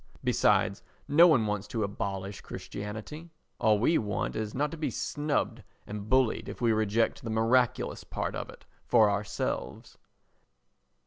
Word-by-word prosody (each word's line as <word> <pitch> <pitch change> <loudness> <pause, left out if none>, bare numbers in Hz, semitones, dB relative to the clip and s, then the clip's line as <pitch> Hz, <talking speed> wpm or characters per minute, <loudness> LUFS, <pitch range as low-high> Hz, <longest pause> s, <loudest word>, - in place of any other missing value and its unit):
Besides - - +2 0.3
no 165 +5 +7
one 135 -10 +4
wants 105 0 -2
to 110 0 -2
abolish 100 -1 -4
Christianity—all 110 +2 -3
we 140 +10 +3
want 105 -1 -2
is 110 -1 -3
not 145 +3 0
to - - -5
be 155 - -1
snubbed 145 -5 -2 0.2
and 105 0 -7
bullied 130 -2 +2
if - - -8
we 120 -2 +3
reject 110 +1 +1
the 115 - -4
miraculous 115 +2 +1
part - - -4
of - - -5
it - - -14 0.2
for 110 -3 +5
ourselves. 100 0 -4
110 Hz, 140 wpm, -29 LUFS, 105-130 Hz, 0.3 s, no